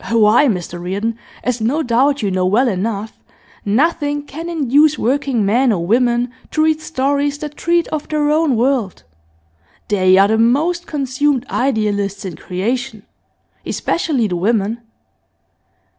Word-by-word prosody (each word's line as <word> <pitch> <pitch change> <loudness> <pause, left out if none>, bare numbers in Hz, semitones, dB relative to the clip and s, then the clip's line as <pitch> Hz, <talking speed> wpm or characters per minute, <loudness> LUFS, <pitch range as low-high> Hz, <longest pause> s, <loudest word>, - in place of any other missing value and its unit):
Why, 230 +4 +4
Mr 175 -5 -3
Reardon, 205 +6 -3 0.2
as 250 -2 -2
no 275 +9 0
doubt 260 +2 +1
you 200 - 0
know 185 0 0
well 230 +8 +3
enough, 210 +1 -3 0.4
nothing 290 +6 0
can 325 +4 -7
induce 300 -1 +3
working 260 -3 0
men 240 +5 +3
or 170 -5 -1
women 240 +3 +1 0.2
to 310 - +1
read 315 0 +1
stories 285 -1 -1
that 295 0 -7
treat 340 0 +1
of 305 -1 -4
their 300 -1 +1
own 305 -3 +2
world. 240 -4 0 0.9
They 185 -2 +4
are 195 +1 +6
the 220 +1 +1
most 310 +10 +1
consumed 275 -2 -1
idealists 210 -6 -1
in 180 -4 -5
creation, 220 +6 -3 0.6
especially 295 -8 -1
the 180 -3 -2
women. 215 +3 0
245 Hz, 140 wpm, -17 LUFS, 210-290 Hz, 0.9 s, are